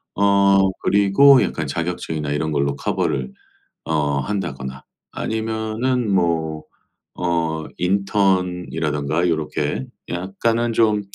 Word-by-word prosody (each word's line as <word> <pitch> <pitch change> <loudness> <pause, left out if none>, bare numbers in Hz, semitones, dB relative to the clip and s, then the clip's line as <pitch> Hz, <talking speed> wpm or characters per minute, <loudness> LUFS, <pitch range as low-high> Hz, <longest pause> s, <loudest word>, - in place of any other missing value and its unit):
어 100 0 +4 0.2
그리고 105 +7 +5
약간 80 -3 -3
자격증이나 80 -1 -3
이런 80 +1 -1
걸로 70 -1 0
커버를 65 -2 -1 0.5
어 75 -3 0
한다거나 70 -9 -4 0.3
아니면은 110 +1 -2
뭐 80 -4 0 0.6
어 85 -3 -1
인턴이라든가 90 -5 0
요렇게 75 -4 -1 0.2
약간은 115 +6 -1
좀 110 -2 +3
90 Hz, 225 characters per minute, -21 LUFS, 75-100 Hz, 0.6 s, 그리고